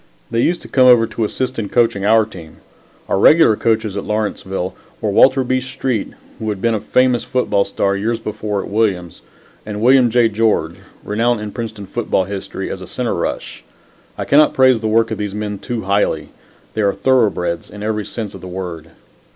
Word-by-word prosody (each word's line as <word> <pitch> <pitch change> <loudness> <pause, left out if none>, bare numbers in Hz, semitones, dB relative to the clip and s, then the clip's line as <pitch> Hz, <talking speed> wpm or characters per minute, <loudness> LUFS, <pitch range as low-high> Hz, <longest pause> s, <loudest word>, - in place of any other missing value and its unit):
They 115 0 +1
used 175 +5 0
to - - -10
come 130 -1 +4
over 120 -2 +7
to 115 0 -2
assist 130 +3 -3
in 105 -3 -3
coaching 115 -5 +1
our 110 0 +5
team. 85 -7 -12 0.5
Our - - 0
regular 150 -3 +6
coaches 110 -2 0
at 100 - -3
Lawrenceville 95 -3 -3 0.3
were 105 - -1
Walter 130 +6 +5
B. 130 +1 0
Street, 130 -3 -3 0.3
who 110 - -3
had 105 -2 -3
been 115 +3 +1
a 110 - 0
famous 125 +3 +2
football 125 -6 0
star 100 0 0
years 115 +3 -1
before 105 -2 -3
at - - -8
Williams, 100 -5 -1 0.4
and 105 -1 -6
William 125 +2 +5
J. 120 0 +4
George, 105 -6 0 0.3
renowned 115 +3 0
in 105 -1 -6
Princeton's 110 -4 -6
football 95 - 0
history 100 +1 -5
as - - -6
a - - -8
center - - -2
rush. - - -4 0.5
I - - -3
cannot 150 +2 +4
praise 130 -3 +4
the 110 - -1
work 115 +1 +2
of 110 - -3
these 105 -1 -3
men 105 -1 -4
too 120 -3 -4
highly. 100 +2 0 0.4
They 110 - -1
were 100 -1 +1
thoroughbreds 100 -7 +1
in 105 0 -9
every 105 -1 -2
sense 110 -4 -5
of 95 - -10
the 95 - -8
word. 90 -3 -6
110 Hz, 195 wpm, -18 LUFS, 100-120 Hz, 0.5 s, over